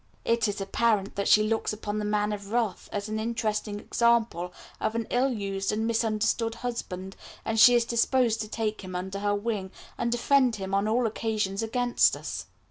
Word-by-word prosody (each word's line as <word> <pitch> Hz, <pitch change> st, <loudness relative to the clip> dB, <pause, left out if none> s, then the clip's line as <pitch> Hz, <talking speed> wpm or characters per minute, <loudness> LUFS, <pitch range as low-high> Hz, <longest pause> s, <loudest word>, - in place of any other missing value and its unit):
It 230 Hz, -1 st, +2 dB
is 205 Hz, -, -2 dB
also 200 Hz, -, -3 dB
apparent 205 Hz, -1 st, +1 dB
that 200 Hz, -, -1 dB
she 215 Hz, -, +6 dB
looks 220 Hz, 0 st, 0 dB
upon 210 Hz, 0 st, -4 dB
the 210 Hz, -, -2 dB
Man 210 Hz, 0 st, 0 dB
of 200 Hz, 0 st, -7 dB
Wrath 230 Hz, -4 st, -1 dB
as 205 Hz, 0 st, -3 dB
an 215 Hz, 0 st, -3 dB
interesting 220 Hz, -2 st, -2 dB
example 230 Hz, -6 st, +1 dB, 0.3 s
of 220 Hz, -, -1 dB
an 230 Hz, -1 st, -1 dB
ill 260 Hz, +2 st, +2 dB
used 195 Hz, -3 st, -2 dB
and 215 Hz, +1 st, -1 dB
misunderstood 225 Hz, 0 st, 0 dB
husband, 190 Hz, -6 st, -5 dB, 0.3 s
and 225 Hz, 0 st, 0 dB
she 245 Hz, +2 st, +9 dB
is 235 Hz, -1 st, +3 dB
disposed 235 Hz, -1 st, +2 dB
to 215 Hz, -, -4 dB
take 215 Hz, 0 st, -2 dB
him 185 Hz, -1 st, -7 dB
under 190 Hz, +2 st, -4 dB
her 205 Hz, 0 st, +1 dB
wing, 205 Hz, -2 st, -2 dB, 0.3 s
and 235 Hz, -, 0 dB
defend 250 Hz, 0 st, +3 dB
him 195 Hz, -1 st, -5 dB
on 200 Hz, +1 st, +2 dB
all 235 Hz, +3 st, +2 dB
occasions 215 Hz, -2 st, -1 dB
against 245 Hz, +2 st, +2 dB
us. -, -, -6 dB
215 Hz, 195 wpm, -27 LUFS, 205-235 Hz, 0.3 s, she